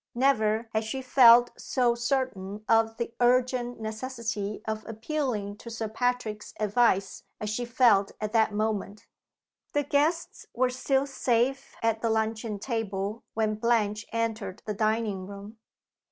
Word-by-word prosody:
Never 230 -4 +2
had 220 0 +1
she 260 +5 -4
felt 245 -2 +7
so 245 -3 +1
certain 235 -5 -2
of 225 0 +3
the 235 -1 -4
urgent 245 0 +2
necessity 220 -2 -4
of 220 0 -3
appealing 225 -3 -3
to 235 - -10
Sir 225 -1 -4
Patrick's 220 -2 -2
advice 210 -2 +2 0.2
as 210 0 -3
she 245 +3 -2
felt 235 -5 +4
at 215 +1 -4
that 220 -1 +3
moment. 210 -1 -2 0.7
The 290 - +2
guests 300 +4 0
were 250 +1 +2
still 265 +2 +1
safe 270 0 0
at 225 -1 +1
the 230 - +1
luncheon 220 -1 -1
table 210 -2 -3
when 220 -1 +1
Blanche 215 -2 0
entered 225 -4 -3
the 210 - -2
dining 215 -3 -1
room. 200 +2 -10
225 Hz, 140 wpm, -27 LUFS, 215-245 Hz, 0.7 s, felt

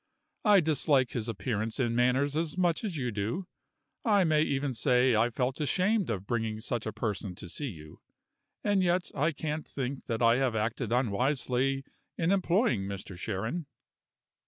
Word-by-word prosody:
I 205 -3 +6
dislike 145 -4 +2
his 115 -1 -3
appearance 110 +1 -2
and 125 -3 +2
his - - -2
manners 130 +4 +2
as 160 +1 -1
much 175 0 +1
as 195 -7 -3
you 125 -3 -1
do 110 - -2 0.6
I 205 -5 +4
may 155 -3 +3
even 140 -3 0
say 125 0 +3
I 115 +2 +3
felt 130 +4 -2
ashamed 190 - +2
of 100 -4 -2
bringing 110 -1 -1
such 115 0 -3
a - - -1
person 105 -3 -3
to 90 - -9
see 145 - -4
you. 75 - -10 0.6
And 205 -2 +2
yet 180 0 +1
I 150 +4 +1
can't 155 0 -4
think 135 0 -4
that 115 0 -1
I 115 +1 +5
have 130 -4 +1
acted 110 +2 -1
unwisely 130 +3 +1 0.3
in 165 +1 +1
employing 185 - +2
Mr. 100 -1 -6
Sharon." 110 - -3
130 Hz, 170 wpm, -30 LUFS, 110-155 Hz, 0.6 s, I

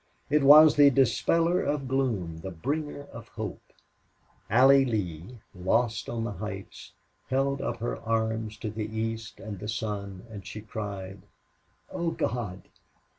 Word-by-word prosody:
It 150 +1 +4
was 150 +2 +9
the 145 -1 +8
dispeller 165 +7 +2
of 145 -2 -1
gloom, 110 -12 -1
the 95 - -5
bringer 145 - -3
of 115 0 -9
hope. 110 -5 -6 0.9
Allie 135 +1 +6
Lee, 105 -2 -3 0.2
lost 105 +4 0
on 115 -1 -2
the 115 - -3
heights, 100 0 -8 0.4
held 135 +1 0
out - - -2
her 120 - -2
arms 110 -1 -1
to 110 - -3
the 110 0 -4
east 115 0 -4
and 105 -4 -7
the 105 - -6
sun, 100 -3 -4
and 105 -4 -9
she 105 +3 -8
cried: 100 -3 -6 0.7
"Oh, 170 -1 -1
God!... 110 - -3
110 Hz, 140 wpm, -28 LUFS, 100-135 Hz, 0.9 s, was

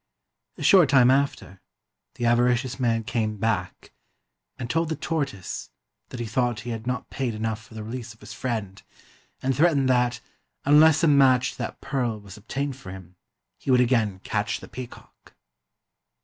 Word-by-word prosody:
A - - -6
short 180 -8 +6
time 130 -3 +6
after, 135 -8 -1 0.5
the 120 -3 -3
avaricious 120 +2 +2
man 115 -2 +1
came 110 -1 -2
back 100 -4 -2 0.6
and 120 - -5
told 165 +5 0
the 160 - -1
tortoise 140 - -4 0.4
that 125 - -8
he 120 - -2
thought 120 +1 -1
he 120 - -5
had 115 +1 -6
not 125 0 -3
paid 125 -5 -2
enough 110 0 -3
for 110 - -16
the 110 - -6
release 120 +1 -6
of - - -29
his - - -10
friend, 110 -6 -4 0.6
and 135 0 +1
threatened 145 -3 +3
that, 125 -1 +2 0.5
unless 155 +3 +6
a - - +5
match 130 -3 +4
to - - -15
that - - -5
pearl 120 -6 -2
was 100 -2 -12
obtained 135 +6 -4
for 115 -8 -11
him, 90 -1 -11 0.4
he - - -7
would 130 - +6
73 125 +1 +4
INDIA 105 -4 -1
again - - -18
catch - - -1
the - - -11
peacock. 125 -2 -11
120 Hz, 175 wpm, -25 LUFS, 110-135 Hz, 0.6 s, short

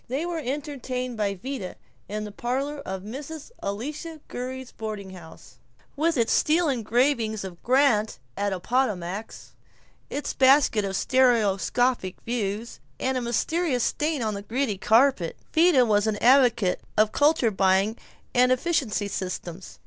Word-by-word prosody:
They 270 +7 -2
were 345 -2 -3
entertained 255 -2 -4
by 205 -2 -1
Vida 250 -1 -6 0.3
in 210 +1 -3
the 210 - -6
parlor 270 +7 -3
of 190 -7 -6
Mrs. 285 - -8
Elisha 300 +10 -5
Gurrey's 255 +1 -6
boarding 210 -3 -6
house, 170 -3 -13 0.4
with 320 +1 +1
its 230 -2 +2
steel 325 +2 +3
engraving 235 -1 +1
of 180 -3 -9
Grant 245 - +2 0.2
at 200 +1 -1
Appomattox, 200 -1 -2 0.6
its 290 0 -3
basket 265 -5 +4
of 195 0 -3
stereoscopic 240 -3 +2
views, 225 -1 -3 0.2
and 260 0 0
its 255 - -1
mysterious 250 +3 0
stains 300 -5 -1
on 215 - -1
the 200 - -5
gritty 225 -1 -2
carpet. 225 -5 +3 0.2
Vida 320 -6 +5
was 210 -1 +2
an 215 -1 0
advocate 240 -6 +4 0.2
of 215 0 +4
culture 290 -6 +3
buying 195 +2 +2 0.4
and 250 0 +4
efficiency 255 -7 0
systems. 185 -2 -6
240 Hz, 135 wpm, -25 LUFS, 205-275 Hz, 0.6 s, Vida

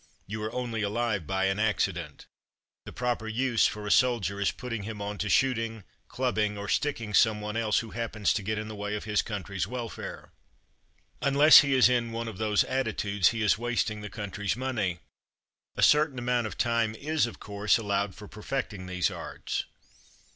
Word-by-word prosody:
You 105 +2 -5
are 110 +1 -3
only 120 -3 -3
alive 105 -4 -1
by 95 +2 0
an 95 +1 0
accident. 90 -8 -1 0.6
The - - -8
proper 120 -2 -2
use 120 +1 +2
for 105 0 -6
a 105 - -1
soldier 115 -6 +2
is 100 - +3
putting 120 -3 -5
him 105 +1 -6
on 100 0 -5
to 105 - -1
shooting, 115 -3 +1 0.2
clubbing, 110 -5 -1
or 100 0 -5
sticking 115 -4 -1
someone 105 0 +2
else 110 -2 +1
who 115 -2 -9
happens 110 -3 -1
to 105 - -1
get 110 +2 -2
in 110 0 -4
the 110 - -7
way 105 0 -3
of 105 - -5
his 105 -1 +1
country's 100 -3 -4
welfare. 120 -1 -6 0.9
Unless 145 +2 +8
he 140 -2 +2
is 130 - +7
in 120 -2 0
one 115 0 -4
of 110 -5 -7
these 105 -2 +2
attitudes 110 -7 0
he 115 -1 -2
is 105 0 +3
wasting 115 -3 -1
the 105 - -6
country's 105 0 -3
money. 110 -10 -2 0.7
A - - 0
certain 150 -3 +4
amount 120 -1 0
of - - -8
time 115 -2 +1
is, 150 +1 0
of 115 - -10
course, 100 +2 +1
allowed 100 -3 -1
for 105 - -11
perfecting 105 -3 -5
these 90 -1 0
arts. - - -4
110 Hz, 185 wpm, -28 LUFS, 105-120 Hz, 0.9 s, Unless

